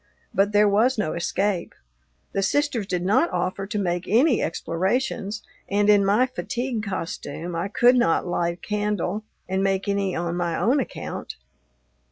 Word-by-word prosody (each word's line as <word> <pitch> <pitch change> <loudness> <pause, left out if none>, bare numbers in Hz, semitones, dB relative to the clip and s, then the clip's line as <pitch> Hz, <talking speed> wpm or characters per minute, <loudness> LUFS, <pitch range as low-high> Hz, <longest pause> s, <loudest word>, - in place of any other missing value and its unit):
But 200 +1 +2
there 210 0 +5
was 225 +6 +3
no 200 -7 -1
escape. 180 +1 -1 0.6
The 195 - 0
sisters 240 -1 0
did 180 -2 -2
not 220 - +3
offer 185 +2 -2
to 210 - -3
make 175 -3 -1
any 245 - +4
explorations, 200 +5 -1 0.3
and, 205 +1 +4
in 205 -1 +5
my 205 +6 +4
fatigue 250 -2 -3
costume, 170 -3 -5
I 170 +3 -1
could 240 +5 +4
not 210 -10 +2
light 170 -1 0
a - - -15
candle 210 -1 -1 0.2
and 190 +1 0
make 195 +1 0
any 200 -2 0
on 170 0 -2
my 175 -2 -1
own 240 - +3
account. 260 - -5
200 Hz, 160 wpm, -24 LUFS, 180-220 Hz, 0.6 s, there